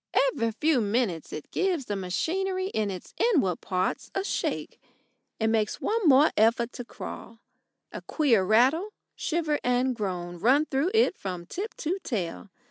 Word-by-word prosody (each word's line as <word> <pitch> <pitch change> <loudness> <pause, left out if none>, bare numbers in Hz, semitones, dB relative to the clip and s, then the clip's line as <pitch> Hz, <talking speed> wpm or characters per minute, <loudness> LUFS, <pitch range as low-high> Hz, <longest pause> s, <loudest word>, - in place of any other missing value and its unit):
Every 230 - 0
few 275 +4 +1
minutes 205 -6 -1
it 155 - -7
gives 360 -8 0
the 205 - -3
machinery 370 - -1
in 215 - -1
its 185 -2 -7
inward 285 - +2
parts 185 0 -2
a 390 - 0
shake, - - -3 0.6
and 220 0 +2
makes 215 -2 0
one 440 -4 0
more 285 +2 +6
effort 230 +2 +3
to 245 - -6
crawl. 230 - -8 0.5
A - - -7
queer 250 - +2
rattle, 260 - +3 0.2
shiver, 310 -3 -1
and 250 +1 +1
groan 175 -5 -4
run 265 - +4
through 285 +4 0
it 445 -4 +4
from 180 -3 -5
tip 395 - -5
to 350 +5 -2
tail. 200 - -4
245 Hz, 155 wpm, -27 LUFS, 200-320 Hz, 0.6 s, more